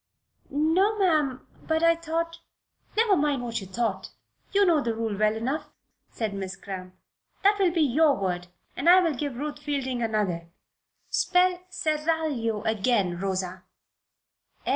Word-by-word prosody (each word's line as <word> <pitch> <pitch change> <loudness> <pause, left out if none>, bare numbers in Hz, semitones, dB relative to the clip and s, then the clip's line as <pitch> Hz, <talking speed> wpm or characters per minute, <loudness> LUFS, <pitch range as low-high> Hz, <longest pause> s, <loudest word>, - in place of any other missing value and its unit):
"No, 330 +9 +2
ma'am; 305 -9 +1 0.2
but 320 0 +1
I 335 0 +6
thought..." 330 0 -3 0.6
"Never 440 -3 +4
mind 290 -5 +1
what 235 -2 -3
you 190 - -8
thought. 215 +1 -2 0.4
You 400 0 +4
know 330 -5 +4
the 230 -4 -1
rule 225 -2 -2
well 215 +1 +2
enough," 260 +8 -3 0.4
said 220 -3 -3
Miss 195 -1 -5
Cramp. 185 -2 -8 0.5
"That 405 +1 +5
will 380 -2 +4
be 335 -1 0
your 295 +1 +4
word, 180 -2 -2 0.3
and 340 - +2
I 365 +1 +9
will 335 -4 +1
give 285 -1 -3
Ruth 295 +2 -4
Fielding 275 -4 -2
another. 205 -7 -1 0.6
Spell 360 0 +3
'seraglio' 305 - -1
again, 215 -5 +1
Rosa." 185 -1 -2
275 Hz, 140 wpm, -26 LUFS, 215-330 Hz, 0.6 s, I